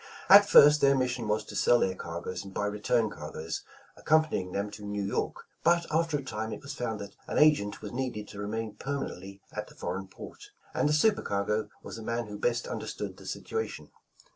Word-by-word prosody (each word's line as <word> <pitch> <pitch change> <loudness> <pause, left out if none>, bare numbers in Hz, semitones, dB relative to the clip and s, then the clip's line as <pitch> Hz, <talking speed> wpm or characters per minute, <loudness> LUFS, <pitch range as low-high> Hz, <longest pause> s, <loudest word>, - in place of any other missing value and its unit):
At 200 +1 +9
first 150 -3 +8
their 140 0 +5
mission 125 -3 -1
was 105 +1 +1
to - - -9
sell 120 - +5
their 95 -5 +1
cargoes 90 +1 -5
and 100 - -10
buy 105 - -2
return 105 +2 +1
cargoes, 80 -1 -5 0.3
accompanying 155 -12 +1
them 100 +2 -2
to 105 0 -10
New 105 0 -3
York. 100 - -2 0.2
But 170 0 +4
after 160 -1 +1
a 140 - -6
time 110 -3 -4
it - - -7
was 140 +1 -6
found 115 -5 -3
that 100 - -9
an - - -2
agent 150 -10 +3
was - - -5
needed 120 -5 -3
to 105 - -9
remain 110 +1 -3
permanently 100 -9 -5
at - - -4
the - - -16
foreign 95 0 -4
port, - - -11 0.3
and 150 - +2
the - - +2
super 205 +8 +3
cargo 105 +1 -1
was - - -7
the - - -7
man 115 +1 -2
who 105 -1 -8
best 120 -1 0
understood - - -5
the - - -12
situ 450 - -3
ation. 450 - -6
110 Hz, 210 wpm, -29 LUFS, 100-140 Hz, 0.3 s, At